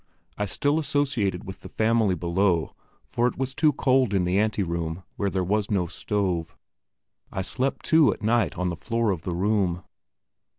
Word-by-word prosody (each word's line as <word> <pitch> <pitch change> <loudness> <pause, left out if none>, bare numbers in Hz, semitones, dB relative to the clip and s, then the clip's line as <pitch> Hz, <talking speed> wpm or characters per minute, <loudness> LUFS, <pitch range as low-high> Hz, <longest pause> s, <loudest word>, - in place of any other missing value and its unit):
I 105 - -1
still 145 +9 +1
associated 140 - 0
with 95 - -9
the - - -10
family 110 -3 +2
below, 85 0 +1 0.3
for 120 +1 +1
it - - -3
was 130 0 -2
too 155 +2 +3
cold 130 -5 +2
in 95 - +2
the 90 +2 +2
ante 110 -1 +1
room 85 0 -3
where 100 - 0
there 95 -1 -1
was 105 +3 0
no 95 -4 +1
stove. 90 0 -2 0.8
I 95 - -2
slept, 130 +7 -2
too, 160 -3 +5
at - - -7
night 115 -1 +1
on 90 0 0
the 85 - -3
floor 115 +4 0
of 90 -4 -3
the 90 0 -3
room. 95 -2 0
100 Hz, 180 wpm, -25 LUFS, 90-120 Hz, 0.8 s, too